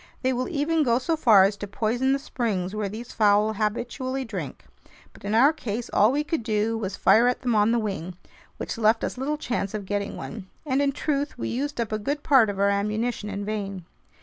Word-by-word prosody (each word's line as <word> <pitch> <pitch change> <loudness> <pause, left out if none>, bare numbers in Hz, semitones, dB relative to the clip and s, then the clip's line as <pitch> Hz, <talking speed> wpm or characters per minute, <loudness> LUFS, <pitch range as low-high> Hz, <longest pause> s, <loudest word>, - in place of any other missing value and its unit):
They 260 0 +2
will 255 +1 -2
even 315 +1 +1
go 240 -5 +3
so 320 +6 0
far 225 -10 +6
as 200 +2 +2
to 205 - -6
poison 235 +6 0
the 275 - +3
springs 210 -9 -3
where 210 -2 -2
these 230 +4 -8
fowl 210 0 +3
habitually 245 +5 -2
drink. 185 - -6 0.5
But - - -17
in 205 +2 -1
our 275 +7 +6
case, 235 -5 -5
all 210 +3 +5
we 290 +2 0
could 310 -1 -2
do 220 0 0
was 200 -4 -3
fire 235 +3 +5
at 250 - -1
them 245 -2 +1
on 210 +1 +3
the 235 - +2
wing, 190 -5 -3 0.4
which - - -5
left 225 +1 +3
us - - -3
little 295 +3 -1
chance 225 -8 -3
of 205 -2 -5
getting 200 +1 -3
one. 210 -4 -7 0.2
And 270 -1 +1
in 280 -1 +2
truth, 285 0 -2
we - - -3
used 280 +3 -3
up 230 -2 -2
a 215 - -1
good 285 +7 -3
part 265 -8 +5
of 200 - -4
our 200 +1 +3
ammunition 210 +2 -1
in 200 0 -4
vain. 200 -4 -4
225 Hz, 225 wpm, -25 LUFS, 205-260 Hz, 0.5 s, far